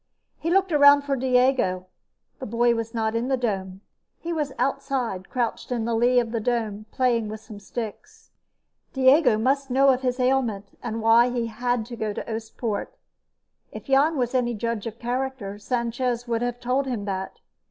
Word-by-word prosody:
He 330 - -2
looked 380 +1 +2
around 285 -1 +7
for 280 -1 -1
Diego. 250 -7 +2 0.5
The 260 - -6
boy 235 +2 +2
was 230 0 -4
not 220 -1 0
in 230 +2 -1
the 265 -1 +1
dome. 195 -5 -3 0.4
He 340 0 -4
was 300 -4 -2
outside, 260 -7 -2
crouched 245 0 -2
in 235 -2 -1
the 235 - -1
lee 245 +2 +4
of 235 -2 -2
the 230 - -1
dome, 215 -2 -2
playing 235 -4 +1
with 215 +1 -6
some 215 -1 -11
sticks. 215 +1 -8 0.6
Diego 265 -2 +5
must 270 +5 0
know 270 +2 +4
of 260 -1 +3
his 250 0 -1
ailment, 245 -6 0
and 225 -2 -4
why 230 +2 +6
he 240 -1 -1
had 240 0 -1
to 240 +1 -8
go 215 -2 -3
to - - -5
Oostpoort. 225 -1 -3 0.8
If - - -8
Jan 285 +3 +3
was 245 -1 -1
any 240 -2 +1
judge 230 0 -3
of 225 0 -7
character, 245 -4 -3
Sanchez 240 +1 -2
would 230 -1 -1
have 245 0 -2
told 255 +3 0
him 230 -6 -3
that. 190 -1 -4
240 Hz, 180 wpm, -24 LUFS, 225-260 Hz, 0.8 s, around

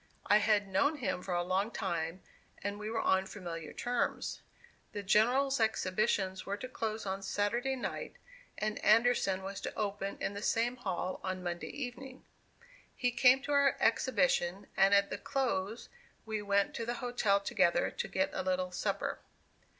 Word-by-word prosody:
I 205 - +6
had 210 -1 +2
known 280 +11 +2
him 185 -9 -2
for 180 -1 -3
a 175 - +1
long 190 +4 0
time, 170 -4 -3 0.4
and 205 +1 -3
we 210 0 -4
were 225 0 -1
on 190 0 +2
familiar 170 -6 -6
terms. 245 +1 -2 0.5
The 205 -1 -4
General's 250 +7 +3
exhibitions 190 -3 +1
were 200 +1 -3
to 255 - -6
close 220 -4 -3
on 195 0 -3
Saturday 235 +7 0
night, 255 - -5 0.4
and 215 0 -2
Anderson 215 -4 +4
was 195 +1 -5
to - - -5
open 200 -1 -2
in - - -2
the 200 - -5
same 235 +3 +1
hall 185 -5 -3
on 185 -1 -3
Monday 175 -1 -4
evening. 260 0 -7 0.7
He 245 -1 +1
came 255 +2 +5
to 290 - -3
our 280 -1 +4
exhibition, 195 -5 +2
and 195 +1 +5
at 200 0 +3
the - - -3
close 235 -6 -2 0.4
we 220 -1 -2
went 200 -1 +1
to 230 - -3
the 240 - -1
hotel 240 -6 +1
together 175 -3 +2
to - - -3
get 190 -1 0
a - - -1
little 185 -1 -1
supper. 180 - -2
205 Hz, 165 wpm, -32 LUFS, 190-240 Hz, 0.7 s, I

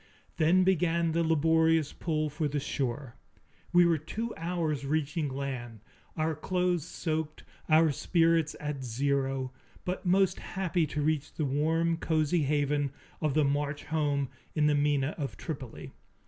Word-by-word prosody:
Then 170 +3 +4
began 170 -2 +2
the 165 +1 +1
laborious 160 -1 +3
pull 155 -2 -1
for 155 +1 -1
the 145 0 -1
shore. 135 -2 -3 0.6
We 175 0 +6
were 165 -2 +3
two 225 +10 -4
hours 165 -4 -2
reaching 150 +1 -1
land, 130 -5 -5 0.4
our 160 0 +1
clothes 180 +1 0
soaked, 155 -2 -3 0.3
our 160 0 +5
spirits 165 +1 +2
at 150 -2 -4
zero, 135 +1 -1 0.3
but 180 +1 -3
most 185 0 +3
happy 180 -4 -1
to 150 0 -2
reach 155 -1 0
the 155 - -1
warm, 160 +4 +1
cozy 160 0 +1
haven 145 0 +1 0.3
of 150 -3 0
the 155 -2 +4
March 145 +1 -1
home 145 -4 0 0.3
in 150 -2 +3
the 150 - +4
Mina 145 0 +1
of 140 -2 -4
Tripoli. 135 -7 -7
155 Hz, 145 wpm, -30 LUFS, 140-165 Hz, 0.6 s, We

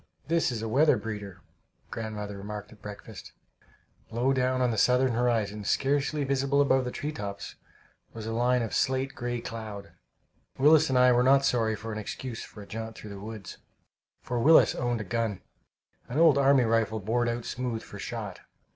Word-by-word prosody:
"This 165 -3 +2
is 115 -2 -4
a - - -2
weather 145 +7 +4
breeder," 105 -4 -7 0.5
grandmother 105 -2 -5
remarked 105 +1 -7
at 105 -2 -17
breakfast. 105 -1 -10 0.8
Low 120 +4 +1
down 130 0 +1
on 125 -1 +2
the - - -1
southern 125 +2 +3
horizon, 115 -3 0
scarcely 145 +6 +1
visible 140 +1 +1
above 135 -2 +3
the 125 - -3
hilltops, 105 -11 -5 0.6
was 110 -1 -8
a 115 - -3
line 125 +1 +2
of 115 - -5
slate 130 +1 0
gray 120 -1 -3
cloud. 110 -4 -7 0.7
Willis 155 +2 +5
and 130 - +2
I 125 0 +6
were 120 0 +4
not 135 +2 +5
sorry 115 -3 +2
of 105 +1 -8
an 110 -1 -4
excuse 115 +2 -6
for 105 - -10
a - - -15
jaunt 110 0 -6
through 105 - -9
the 100 - -8
woods, 105 -1 -8 0.6
for 120 -1 -2
Willis 160 +7 +6
owned 120 -2 -1
a - - -4
gun 110 -1 -2 0.7
an 125 - -3
old 160 -4 +6
army 135 -1 +5
rifle 110 -1 +1
bored 120 +4 0
out 120 0 -3
smooth 125 -3 -3
for - - -10
shot. - - -5
120 Hz, 180 wpm, -28 LUFS, 110-130 Hz, 0.8 s, I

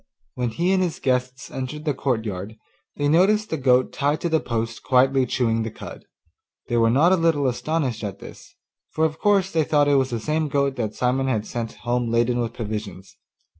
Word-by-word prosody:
When 125 -1 -2
he 170 +10 0
and 190 - +2
his 175 -3 -1
guests 125 0 -1
entered 140 +4 -5
the 150 - +1
courtyard, 110 -6 -3 0.4
they 145 - 0
noticed 200 +7 +3
the - - +1
goat 130 -2 +2
tied 145 +2 0
to 170 - -1
the 160 -1 +2
post 115 -3 -3
quietly 130 0 +3
chewing 115 -2 0
the 110 - -3
cud. - - -10 0.6
They 120 - +1
were 115 -1 +4
not 145 +9 +4
a - - +6
little 165 -5 +1
astonished 130 -2 -2
at 100 -2 -4
this, - - -13 0.3
for 160 - 0
of 155 0 -3
course 195 -2 +2
they 160 -1 +2
thought 145 -1 +2
it 145 -1 +4
was 130 -1 +1
the 120 -2 -3
same 155 +6 -1
goat 140 -1 0
that 110 -3 -3
Simon 130 +2 0
had 110 -5 -1
sent 115 -2 -5
home 120 0 0
laden 120 +1 +1
with 120 -1 -1
provisions. 105 -4 -6
130 Hz, 205 wpm, -23 LUFS, 115-155 Hz, 0.6 s, a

